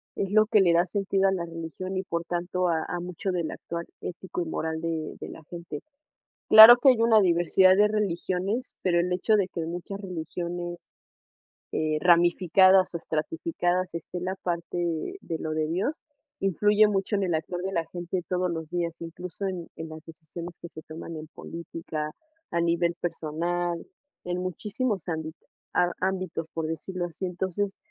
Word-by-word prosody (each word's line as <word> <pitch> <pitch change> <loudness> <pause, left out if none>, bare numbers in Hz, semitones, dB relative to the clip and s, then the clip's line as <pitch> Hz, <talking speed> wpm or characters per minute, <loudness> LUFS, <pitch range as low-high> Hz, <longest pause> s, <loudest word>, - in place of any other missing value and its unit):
es 195 0 -2
lo 215 0 +5
que 215 -3 +5
le 175 -2 +4
da 170 +1 +4
sentido 195 0 +1
a - - +1
la 175 -3 -1
religión, 165 +3 -6
y, 185 - -1
por 170 -2 -3
tanto, 175 +1 -1
a 160 -1 +1
a 175 - -3
mucho 180 +2 -3
del 170 -3 -2
actuar 170 0 -6 0.2
ético 180 0 -5
y 170 - -2
moral 160 0 -2
de 165 -2 -3
de - - -6
la 160 - -10
gente, 170 0 -6 0.7
claro 220 +2 +12
que 265 +2 +7
hay 245 -3 +2
una 230 -2 +6
diversidad 185 +1 +5
de 210 +1 +5
religiones, 200 +2 -1
pero 175 -2 +3
el 180 +1 0
hecho 200 +4 +2
de 195 -2 +1
que 170 - -4
muchas 175 +4 -5
religiones, 175 -1 -5 0.9
eh, 155 -1 0
ramificadas 180 +2 +5
o 170 - -1
estratificadas, 180 - -1
esté 170 +2 -5
la 185 +2 -3
parte 170 -1 -3 0.4
de 165 - -4
lo 155 - -3
de 155 0 0
Dios, 190 - -2 0.4
influye 210 +3 +4
mucho 195 0 0
en 200 - +1
el 175 -3 0
actuar 175 +3 -3
de 190 +1 -3
la 165 -1 0
gente 175 +1 -3
todos 180 -1 0
los 160 -1 -4
días, 170 -1 -2
incluso 180 +3 -6
en 180 -3 -4
en 160 0 -5
las 155 0 -9
decisiones 170 +1 -9
que - - -8
se 155 - -10
toman 160 +1 -8
en 155 0 -7
política, 165 -2 -6 0.4
a 170 - 0
nivel 170 0 +2
personal, 175 +1 -2 0.5
en 180 0 -2
muchísimos 200 +2 -2
ámbi 160 -1 -3 0.4
a 175 - +4
ámbitos, 185 -3 -2
por 165 -1 -2
decirlo 175 +3 -3
así, 175 +2 -5
entonces 190 +2 -2
175 Hz, 175 wpm, -27 LUFS, 165-190 Hz, 0.9 s, claro